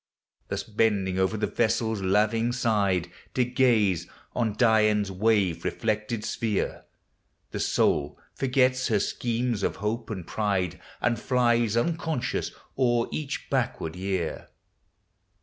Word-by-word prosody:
Thus - - -3
bending 105 -4 +1
o'er 95 +3 +1
the 105 - 0
vessel's 110 0 0
laving 110 +5 +2
side. 100 -7 +1 0.2
To 125 - +3
gaze 120 - +2 0.3
on 115 -3 0
Dian's 105 -3 +3
wave 95 -4 +1
reflected 110 -1 -2
sphere. 110 -4 -2 0.7
The - - -4
soul 70 0 +1 0.2
forgets 130 -1 +2
her 105 -3 +2
schemes 120 +1 -1
of - - 0
Hope 110 +3 -3
and 95 -6 -5
Pride, 95 -5 -1 0.2
And 120 -2 +1
Hies 120 -3 +2
unconscious 160 -1 -1 0.3
o'er 120 -2 +2
each 145 -2 -4
backward 125 - -1
year. 95 -3 -3
110 Hz, 115 wpm, -27 LUFS, 100-120 Hz, 0.7 s, To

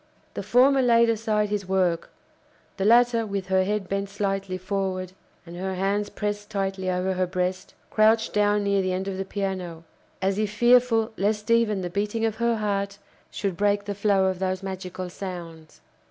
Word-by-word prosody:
The - - -4
former 265 +2 +4
laid 235 -2 +4
aside 215 -2 0
his 205 -2 -2
work; 180 -3 +1 0.7
the 195 - -1
latter, 235 +1 +5
with 200 -3 -4
her 190 0 +3
head 205 -1 -2
bent 195 +1 -2
slightly 195 -2 -2
forward, 185 -1 -3 0.3
and 170 0 -10
her 190 +1 -3
hands 200 +2 0
pressed 205 0 -4
tightly 195 -2 -2
over 185 +1 0
her 185 0 0
breast, 185 +1 -3 0.2
crouched 220 +1 +3
down 205 0 +2
near 200 -1 +2
the 185 -1 -1
end 190 +1 -3
of 190 -1 -3
the 195 - -2
piano, 185 -4 -4 0.4
as 195 +1 0
if 215 -1 0
fearful 240 0 +4
lest 210 +3 0
even 225 -4 +3
the 180 - -3
beating 210 +4 -1
of 220 -1 -1
her 235 0 +1
heart 200 -2 -2 0.3
should 195 -3 -3
break 205 +1 +1
the 205 - -3
flow 200 -1 +2
of 190 -1 0
those 185 0 -2
magical 185 -1 -5
sounds. 170 -4 -8
200 Hz, 180 wpm, -25 LUFS, 185-210 Hz, 0.7 s, latter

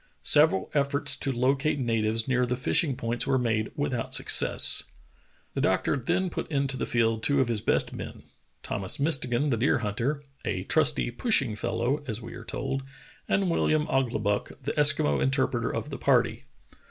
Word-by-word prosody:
Several 95 - +4
efforts 140 0 +1
to 135 - +1
locate 135 +4 0
natives 115 -3 -1
near 125 -1 +1
the 125 0 -2
fishing 140 +2 +1
points 115 +1 -3
were 135 -1 +2
made 110 -3 -1
without 130 -5 -1
success. - - +5 0.7
The - - -2
doctor 95 +8 +1
then 175 +8 -1
put - - -5
into 140 -3 0
the - - -3
field 115 -1 0
two 140 +4 +1
of 130 -3 +1
his 110 -3 -2
best - - +1
men, - - -8 0.4
Thomas 100 +6 -2
Mistegan, 140 -2 +1
the 115 - +1
deer 125 +6 +2
hunter, 120 +6 -3 0.2
"a 90 - -3
trusty, 155 -1 +1
pushing 130 - +1
fellow," 120 +7 -2
as 110 -2 -3
we 115 - -10
are - - -9
told, 135 0 -4 0.5
and 195 - +2
WilHam 155 -4 +1
Ouglibuck, 115 -2 -1
the 140 - -2
Eskimo 145 - +3
interpreter 130 -3 0
of - - -5
the - - -6
party. - - +1
130 Hz, 165 wpm, -26 LUFS, 115-145 Hz, 0.7 s, success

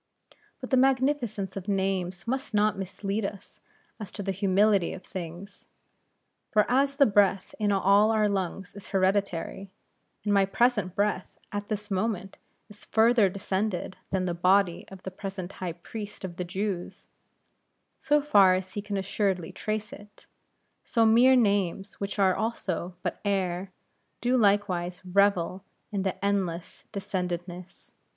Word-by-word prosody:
But - - -8
the 260 - +4
magnificence 255 -7 +1
of 195 0 -6
names 190 -3 -1
must 260 -2 -2
not 210 0 +3
mislead 195 +2 -3
us 195 0 -7 0.4
as 210 -4 -7
to 205 - -5
the 195 - -1
humility 195 0 +2
of 185 - -9
things. 180 +3 -8 0.8
For 210 -1 +3
as 275 +2 +2
the 280 -1 +6
breath 200 -3 +2
in 210 -1 +2
all 200 +2 +4
our 215 -1 +3
lungs 195 -1 -3
is 205 - -10
hereditary, 195 -1 0 0.5
and 205 0 +1
my 200 -1 +5
present 210 -3 +1
breath 205 -2 -1
at 205 0 -4
this 210 -1 -4
moment, 195 -1 -2 0.3
is 210 -1 -13
further 225 -2 +4
descended 190 0 -2
than 190 -1 0
the 175 - -1
body 180 +1 +2
of 190 -1 -12
the 190 - -5
present 190 -1 -6
High 180 -3 -4
Priest 205 +4 -8
of 175 -2 -8
the 180 - -3
Jews, 190 0 -4 0.9
so 295 0 +2
far 200 -10 +6
as 185 0 -4
he 205 - -3
can 200 -1 -4
assuredly 190 -2 -1
trace 215 +3 -4
it; 210 -6 -14 0.6
so 230 -2 +2
mere 240 +4 +6
names, 200 -5 +1
which 200 +1 -4
are 190 -2 +4
also 185 -6 -3
but - - -3
air, 190 -2 -1 0.5
do 245 +2 +1
likewise 195 -5 +1
revel 190 -1 +2 0.3
in 200 -2 -1
this 190 -1 -2
endless 185 -4 -2
descendedness. 180 -2 -5
195 Hz, 145 wpm, -27 LUFS, 185-210 Hz, 0.9 s, the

